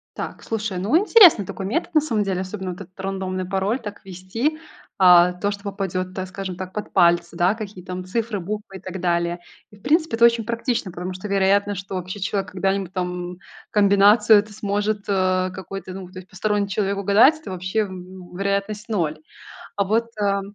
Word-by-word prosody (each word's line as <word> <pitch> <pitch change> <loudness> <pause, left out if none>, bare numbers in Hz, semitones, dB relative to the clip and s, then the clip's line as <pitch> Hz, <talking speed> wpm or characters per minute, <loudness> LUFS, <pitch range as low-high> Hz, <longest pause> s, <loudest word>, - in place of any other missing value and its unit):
Так, - - -6
слушай, 220 -4 -3
ну, 220 - +3
интересный 370 - +7
такой 190 - -6
метод 330 - -2
на 305 - +5
самом 225 -8 0
деле. 190 -2 -2
Особенно 190 -1 -5
вот 180 - -9
этот 185 +1 -14
рандомный 190 -1 -3
пароль 195 +6 -1
так 205 -2 -9
вести, 195 - -3 0.4
а, 180 -2 +7
то, 200 +3 -2
что 200 0 -7
попадёт, 185 -2 -3
так 185 -1 -4
скажем, 190 -1 -6
так 185 0 -7
под 210 - -5
пальцы, 175 -2 +3
да, 180 +4 +3
какие 205 -5 -8
там 185 0 -6
цифры, 215 +2 -2
буквы 205 +1 -6
и - - -12
так 190 +1 -7
далее. 170 0 0 0.3
И - - -15
в - - -23
принципе 315 -3 +2
это 235 - +6
очень 235 -1 +3
практично, 235 -4 -2
потому 180 +2 -5
что 185 +3 -7
вероятность, 200 0 +2
что 195 0 -10
вообще 185 +2 -5
человек 195 -1 -2
когда-нибудь 195 0 -1
там 180 -1 -4 0.3
комбинацию 205 +1 +5
эту 210 +1 -6
сможет, 205 0 -1
э, 185 -1 +1
какой-то, 190 0 -7
ну, 190 -1 -8
то 185 - -13
есть 185 - -14
посторонний 205 +1 -1
человек 200 0 -1
угадать, 210 +11 +5
это 295 - -9
вообще, 185 +4 -2
м, 185 -2 -8
вероятность 200 +3 -2
ноль. 160 -7 -1 0.6
А 200 - +2
вот, 225 +4 +1
э, 200 -1 +2
195 Hz, 195 wpm, -22 LUFS, 185-210 Hz, 0.6 s, интересный